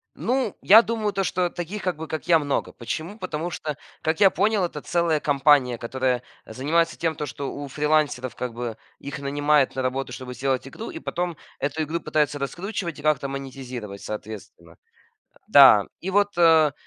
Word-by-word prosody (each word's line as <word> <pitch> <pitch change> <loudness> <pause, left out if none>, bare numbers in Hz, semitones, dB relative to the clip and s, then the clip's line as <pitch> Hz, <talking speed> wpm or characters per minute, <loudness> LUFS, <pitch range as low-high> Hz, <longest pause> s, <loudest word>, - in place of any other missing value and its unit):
Ну, 250 -4 -1
я 220 +4 +8
думаю, 220 -2 -1
то 195 - -1
что 180 -1 0
таких, 180 +4 -5
как 180 -4 -2
бы, 160 0 -6
как 160 +2 -5
я, 165 -2 +6
много. 145 -2 -2
Почему? 165 - -5
Потому 175 -3 -4
что, 150 -3 -5 0.3
как 160 0 0
я 195 -2 +7
понял, 205 +1 +1
это 150 -4 -3
целая 170 -3 +1
компания, 140 -4 +3
которая 125 0 -1 0.2
занимается 155 +8 0
тем, 165 -3 -1
что 140 0 -5
у 145 0 -6
фрилансеров, 145 -3 0
как 125 -2 -4
бы, 120 -2 -5 0.2
их 140 0 -7
нанимает 145 -1 +2
на 130 - -1
работу, 130 0 -2
чтобы 125 0 -7
сделать 130 +1 -1
игру, 225 +11 -7
и 330 - -7
потом 175 - -3 0.2
эту 145 +3 -2
игру 160 +3 -2
пытаются 150 -1 0
раскручивать 175 +3 -4
и - - -8
как-то 150 -3 +1
монетизировать 130 -6 -7
соответственно. 105 -6 -8 0.7
Да, 130 -8 +8 0.2
и 190 - -3
вот, 205 -1 +2
э, 160 -4 +5
150 Hz, 175 wpm, -24 LUFS, 130-175 Hz, 0.7 s, я